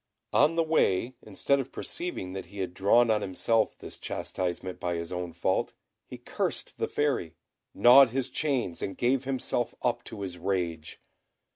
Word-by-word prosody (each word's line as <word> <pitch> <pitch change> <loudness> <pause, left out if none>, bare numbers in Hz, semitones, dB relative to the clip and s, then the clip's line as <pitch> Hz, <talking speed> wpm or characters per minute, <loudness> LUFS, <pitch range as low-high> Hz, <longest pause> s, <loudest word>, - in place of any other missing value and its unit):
On 150 +4 +4
the 165 - +3
way, 130 -7 +2
instead 125 +7 0
of 135 -1 -4
perceiving 170 - -5
that 95 - -6
he 100 - -13
had 95 -2 -3
drawn 110 +5 +4
on 105 -1 +2
himself 110 +4 +1
this - - -10
chastisement 90 0 -4
by 90 -1 -2
his 85 0 -5
own 90 -1 -4
fault, - - -1 0.3
he - - -8
cursed - - -3
the - - 0
Fairy, 135 - -1 0.4
gnawed 125 +2 +8
his 130 +2 -2
chains, 130 - -1
and 95 - -4
gave 130 +2 +1
himself 130 -2 -1
up 120 - 0
to 105 - -8
his 90 -2 -5
rage. 85 -4 -2
105 Hz, 165 wpm, -28 LUFS, 90-130 Hz, 0.4 s, gnawed